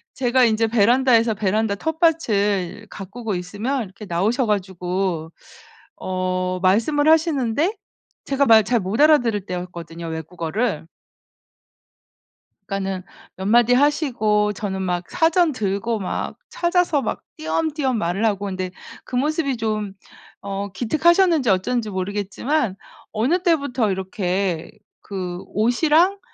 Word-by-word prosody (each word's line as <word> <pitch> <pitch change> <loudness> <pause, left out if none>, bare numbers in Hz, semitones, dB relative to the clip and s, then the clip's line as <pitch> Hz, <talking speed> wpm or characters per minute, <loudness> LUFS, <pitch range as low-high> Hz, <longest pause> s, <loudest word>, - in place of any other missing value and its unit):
제가 255 0 +3
인제 225 0 +2
베란다에서 230 +1 +3
베란다 210 +1 0
텃밭을 215 - 0
가꾸고 205 +1 -5
있으면 210 +9 -3
이렇게 200 +2 -11
나오셔 215 +8 0
가지고 180 -4 -2 0.7
어 185 0 -2
말씀을 235 +11 +3
하시는데 315 - +2 0.5
제가 280 0 +1
말 220 -1 +7
잘 240 +2 +1
못 195 +7 -3
알아들을 245 -10 +4
때였거든요 170 -2 -6
외국어를. 165 +3 -3 1.8
그러니까는 195 -2 -3 0.3
몇 190 - -6
마디 240 +3 +4
하시고 240 -8 +2
저는 190 -2 -4
막 180 -1 -2
사전 330 0 +3
들고 220 0 -2
막 185 - -4
찾아서 345 -4 +1
막 225 - -3 0.2
띄엄띄엄 310 -5 -1
말을 195 +4 -1
하고 205 -1 0
있는데 185 -1 -4 0.3
그 250 - -6
모습이 280 -1 0
좀 215 -3 -2 0.5
어 200 0 -3
기특하셨는지 310 - +3
어쩐지 215 +4 0
모르겠지만 200 +6 -2 0.4
어느 270 +12 +1
때부터 280 - +1
이렇게 185 -2 -2 0.3
그 180 -3 -5
옷이랑 310 - +2
215 Hz, 280 characters per minute, -22 LUFS, 190-265 Hz, 1.8 s, 말